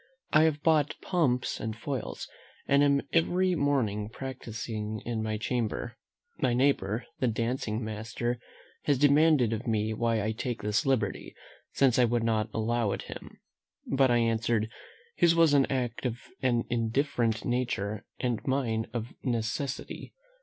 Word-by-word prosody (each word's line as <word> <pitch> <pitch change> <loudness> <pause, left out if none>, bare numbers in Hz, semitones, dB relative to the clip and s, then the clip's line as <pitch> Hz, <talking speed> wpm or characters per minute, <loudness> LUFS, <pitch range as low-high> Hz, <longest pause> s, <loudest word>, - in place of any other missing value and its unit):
I 155 +1 +7
have 150 -2 0
bought 155 -3 +3
pumps 135 -9 +1
and 110 0 -4
foils, 130 0 -4 0.4
and 140 +1 +4
am 140 -1 +3
every 180 +3 +3
morning 120 - 0
practising 110 -4 -5
in 115 -2 -2
my 110 -1 -1
chamber. 120 +1 -2 0.4
My 120 - +2
neighbour, 120 -4 +1
the 130 - +2
dancing 115 0 -1
master, 115 +3 -3 0.5
has 145 -2 +3
demanded 145 -3 +4
of 115 +3 -4
me 110 -1 0
why 115 -1 0
I 110 - 0
take 120 +2 -4
this 105 +8 +1
liberty, 120 -7 -1 0.4
since 130 -3 +3
I 125 - +6
would 120 0 +1
not 110 -2 +1
allow 115 -1 0
it - - -5
him? - - -10 0.6
but 135 -1 +4
I 120 - +4
answered, 115 -1 +1 0.5
"His 170 -1 +5
was 165 -3 +5
an 140 -2 +4
act 125 -1 -1
of 120 -1 -3 0.2
an 120 -2 +2
indifferent 115 -1 0
nature, 110 -4 -1
and 120 -3 -1
mine 120 -5 0
of 120 0 -4
necessity." 125 +3 -3
120 Hz, 145 wpm, -29 LUFS, 110-135 Hz, 0.6 s, I